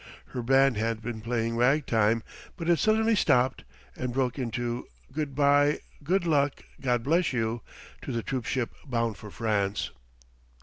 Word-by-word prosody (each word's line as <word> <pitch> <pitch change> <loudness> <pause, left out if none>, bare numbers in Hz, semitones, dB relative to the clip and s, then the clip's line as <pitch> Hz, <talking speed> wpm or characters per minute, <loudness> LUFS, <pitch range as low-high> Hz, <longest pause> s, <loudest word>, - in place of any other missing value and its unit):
Her 125 - -4
band 135 0 +4
had 115 +1 0
been 115 -1 -4
playing 115 0 -1
ragtime, 115 -4 +3 0.3
but 165 -3 -4
it 170 -1 +4
suddenly 220 +1 +3
stopped 130 -8 +2 0.3
and 125 -1 -3
broke 130 +1 0
into 120 0 -3 0.2
"Good 150 -3 -3
by, 145 +1 +4 0.3
Good 180 +4 +1
Luck, 145 -4 +1 0.2
God 125 -3 +1
Bless 165 +3 +2
You," 115 -1 -1 0.4
to - - -5
the 115 -2 -2
troop 130 -4 -3
ship 125 -3 -1 0.2
bound 115 -4 -1
for 105 - -10
France. 105 -2 -1
125 Hz, 150 wpm, -28 LUFS, 115-145 Hz, 0.4 s, band